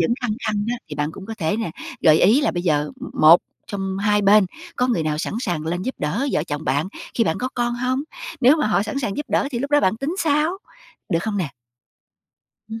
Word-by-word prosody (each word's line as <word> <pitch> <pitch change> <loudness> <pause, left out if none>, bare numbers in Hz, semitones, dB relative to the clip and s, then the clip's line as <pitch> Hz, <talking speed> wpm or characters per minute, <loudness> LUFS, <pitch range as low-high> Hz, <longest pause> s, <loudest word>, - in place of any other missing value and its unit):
vẫn 170 +8 +2
khăng 240 -4 -1
khăng 210 -1 0
á, 245 - -1
thì 150 - -6
bạn 150 +1 -2
cũng 195 +2 -10
có 225 - -5
thể 160 +2 0
nè, 225 -5 -2 0.3
gợi 155 -1 +5
ý 225 +10 +5
là 295 - +2
bây 175 - -3
giờ 150 -4 +1 0.3
một 160 +3 +8 0.3
trong 195 -1 -3
hai 205 +1 +2
bên 200 0 +6 0.3
có 250 - +2
người 235 -10 +1
nào 155 -1 -1
sẵn 160 - -3
sàng 170 -9 -2
lên 175 +2 -2
giúp 260 - -3
đỡ 180 - -1
vợ 150 - +1
chồng 150 -1 -4
bạn 145 +7 0 0.3
khi 230 - +2
bạn 160 -4 0
có 255 - -2
con 240 -1 0
hông? 255 +2 -1 0.4
Nếu 270 +4 +6
mà 305 - +1
họ 210 -2 +2
sẵn 245 +6 -3
sàng 220 -8 -2
giúp 295 - -3
đỡ 275 - +1
thì 245 - -2
lúc 280 +4 -3
đó 290 0 +5
bạn 190 -2 +2
tính 275 +8 -3
sao, 310 +3 +1 0.5
được 165 - +1
không 215 -1 -2
nè? 165 -8 -2 1.2
Ừm 225 0 -6
205 Hz, 245 wpm, -22 LUFS, 165-250 Hz, 1.2 s, một